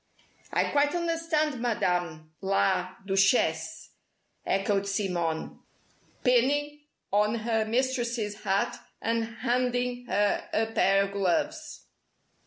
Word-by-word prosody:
"I - - +1
quite 290 +2 +2
understand, 330 -5 0
Madame 175 -9 -1
la 190 -1 +1
Duchesse," 160 -5 +1 0.6
echoed 195 +1 +1
Simone, 180 -5 -2 0.6
pinning 290 +4 +2 0.3
on 210 +2 +3
her 225 -1 0
mistress's 235 -3 -1
hat, 195 0 0 0.2
and 230 0 0 0.2
handing 245 0 0
her 205 0 +1
a 225 - +2
pair 195 -2 +3
of 200 - -4
gloves. 200 - -1
220 Hz, 95 wpm, -28 LUFS, 195-250 Hz, 0.6 s, on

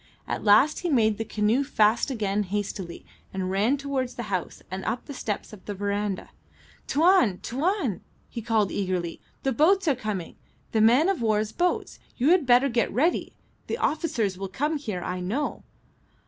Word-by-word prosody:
At - - -3
last 220 +9 +5
he 350 - -2
made 220 -7 +2
the - - 0
canoe 220 +4 +1
fast 220 -2 +2
again 210 -5 -1
hastily, 195 -3 -4 0.3
and 185 -1 -3
ran 215 +9 +2
towards 270 -3 -3
the 240 - -4
house 180 -2 -3
and 190 0 -4
up 230 +3 -2
the 285 - -7
steps 215 -4 -4
of 200 - -12
the 205 - -4
verandah. 200 0 -2 0.6
"Tuan! 325 - +4
Tuan!" 285 - -1 0.3
he 230 - -6
called, 220 -3 +1
eagerly. 180 -3 -2 0.2
"The 270 - +1
boats 345 - +3
are 295 - +5
coming. 215 -8 -5 0.3
The 220 - +2
man 245 +9 +5
of 390 -8 0
war's 215 -1 +1
boats. 355 0 -1 0.2
You 260 +5 +3
had 350 -7 +3
better 250 +2 +6
get 235 -3 0
ready. 320 +8 0 0.3
The - - -2
officers 235 - -1
will 195 -1 -4
come 300 +9 -1
here, 210 -10 -4
I 180 0 -3
know." 220 +12 -2
225 Hz, 175 wpm, -26 LUFS, 200-280 Hz, 0.6 s, better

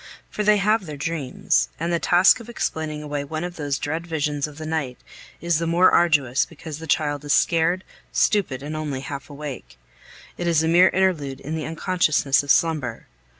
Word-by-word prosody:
For 210 - -2
they 210 0 +4
have 210 -1 +1
their 150 -2 -7
dreams, 145 -3 -1
and 170 +2 -1
the 170 - +1
task 180 +9 +5
of 230 0 -11
explaining 155 -9 -3
away 145 -1 -3
one 155 +3 -5
of 175 0 -5
those 145 -3 -2
dread 160 +4 -4
visions 150 -3 -1
of 150 -1 -13
the 155 - -7
night 155 -6 -3 0.4
is 170 -2 +1
the 165 - -2
more 175 +3 +4
arduous 145 -7 +3
because 160 -1 -9
the 160 - -8
child 145 -2 0
is 145 - +1
scared, 175 +2 +2 0.3
stupid, 160 -11 +1
and 150 +2 -5
only 150 -4 -3
half 140 +2 -7
awake. 145 - -8 0.6
It 175 - -2
is 165 -2 +3
a - - +1
mere 175 +3 +6
interlude 165 -8 0
in 155 +3 -5
the 155 - -4
unconsciousness 160 -4 +1
of 145 - -12
slumber. 145 -8 +1
155 Hz, 195 wpm, -23 LUFS, 145-170 Hz, 0.6 s, mere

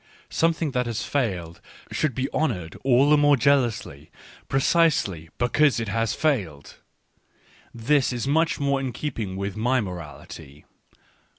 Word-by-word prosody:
Something 165 -2 +1
that 125 -2 -1
has 115 -1 -3
failed 90 - -2 0.3
should 150 -5 -1
be 130 0 -1
honoured 95 - -2
all 135 +1 +4
the 150 - +6
more 145 -1 +4
jealously, 120 - 0 0.4
precisely 135 - +1
because 145 +2 +2
it 115 -3 -3
has 115 +1 -1
failed 95 - -2 0.5
— - - -31 0.2
this 145 -3 +3
is 120 +1 -3
much 160 +4 +1
more 140 -1 +1
in 130 -2 -4
keeping 110 -8 -4
with 100 0 -4
my 125 +4 +1
morality. 75 - -8
125 Hz, 135 wpm, -24 LUFS, 95-140 Hz, 0.5 s, the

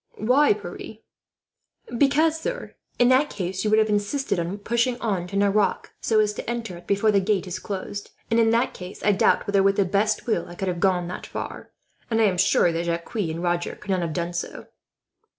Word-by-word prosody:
"Why, 265 - +4
Pierre?" - - -8 1.0
"Because, 305 +5 +3
sir, - - -4 0.2
in 245 0 +4
that 265 +3 +4
case 190 -1 -3
you 215 - +1
would 215 - +4
have 220 0 +4
insisted 210 +2 0
on 170 +4 -3
pushing 235 +4 0
on 195 -6 -1
to 195 - -7
Nerac, 200 +1 +1
so 220 -1 +2
as 210 -1 +2
to 210 - -6
enter 230 -6 -4
it 175 - -15
before 200 +2 +3
the 200 - +4
gate 195 -1 0
is 180 - -5
closed; 200 0 -5 0.2
and 230 - +4
in 225 -1 +4
that 230 +2 +2
case 180 +1 -9
I 210 - +4
doubt 195 - +3
whether, 200 -1 +2
with 195 0 +3
the 200 - +2
best 205 +4 0
will, 230 - 0
I 175 - -9
could 190 +1 -2
have 175 -1 -3
got 180 -2 +2
that 180 - -6
far, - - -6 0.4
and 225 -1 +1
I - - +5
am 190 -4 +2
sure 180 -2 +4
that 165 +1 -2
Jacques 170 0 -3
and 170 -6 -2
Roger 175 0 -1
could 195 - -6
not 185 -1 +1
have 165 -2 -2
done 170 0 -3
so." 170 - -5
200 Hz, 220 wpm, -24 LUFS, 180-225 Hz, 1.0 s, I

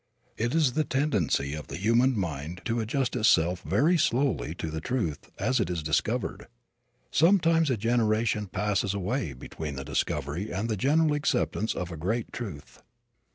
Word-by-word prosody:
It 120 +6 -1
is 155 -6 +3
the 155 - +2
tendency 105 - 0
of 75 -1 -6
the - - -6
human 115 +6 +3
mind 85 0 -4
to 120 -1 0
adjust 125 +4 -1
itself 90 -6 +3
very 165 +5 +2
slowly 120 - +1
to 80 -2 -4
the 80 0 -4
truth, 100 - -2
as 130 +6 +1
it - - 0
is 85 -3 -2
discovered. 75 -1 -1 0.6
Sometimes 165 -2 +4
a 130 - +1
generation 110 -1 +1
passes 100 0 0
away 100 - -2
between 70 +3 -6
the 70 0 -6
discovery 75 +6 -2
and 100 +6 -2
the 110 - 0
general 150 - +3
acceptance 145 -6 0
of 90 -1 -4
a 80 - -6
great 110 +9 -2
truth. 95 - -7
110 Hz, 160 wpm, -28 LUFS, 85-130 Hz, 0.6 s, Sometimes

